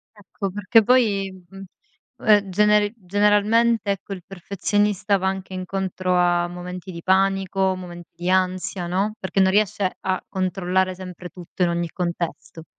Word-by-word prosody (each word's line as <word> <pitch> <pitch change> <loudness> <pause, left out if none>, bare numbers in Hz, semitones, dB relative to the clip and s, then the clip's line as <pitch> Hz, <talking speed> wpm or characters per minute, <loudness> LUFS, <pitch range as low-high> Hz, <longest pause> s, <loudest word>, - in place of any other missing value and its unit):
Ecco, 200 -1 -6
perché 205 +3 +3
poi, 205 -5 +2 0.2
mhmm, 195 0 -10 0.6
ehm, 205 -2 +5
generi 210 +2 +3
generalmente, 210 +2 +2
ecco, 195 +1 -7
il 185 -3 -6
perfezionista 200 +2 0
va 190 0 0
anche 190 0 -5
incontro 185 0 -2
a 175 -1 +2
momenti 180 +1 -7
di 170 -1 -8
panico, 190 0 +2
momenti 175 -2 -9
di 175 +1 -4
ansia, 185 -1 0
no, 195 +5 -1
perché 195 +1 -1
non 190 0 +5
riesce 205 -2 +1
a 185 -1 -2
controllare 185 0 0
sempre 180 -1 -9
tutto, 180 0 -6
in 175 - +3
ogni 170 0 -1
contesto. 170 -4 -4
190 Hz, 145 wpm, -22 LUFS, 180-200 Hz, 0.6 s, ehm